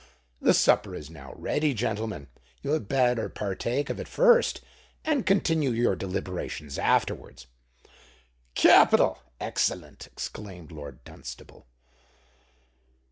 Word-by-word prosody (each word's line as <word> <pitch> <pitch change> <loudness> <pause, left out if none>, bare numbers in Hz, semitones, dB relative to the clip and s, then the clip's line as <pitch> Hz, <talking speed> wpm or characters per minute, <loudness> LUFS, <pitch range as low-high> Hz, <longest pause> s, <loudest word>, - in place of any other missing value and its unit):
The - - +5
supper - - +3
is 75 +1 -9
now 70 -5 -11
ready, 150 -2 0
gentlemen: 110 -7 -3 0.4
you 140 - -2
had 155 -9 0
better 125 -3 +2
partake 120 +8 -2
of - - -4
it - - -6
first, 485 -1 +4 0.5
and 300 -6 0
continue 165 -7 +2
your 115 -4 +1
deliberations 90 -6 -5
afterwards.'" 65 -1 0 1.1
"Capital—excellent!" 60 -1 +3
exclaimed 90 -6 -8
Lord 70 -5 -10
Dunstable. - - -11
110 Hz, 100 wpm, -27 LUFS, -, 1.1 s, The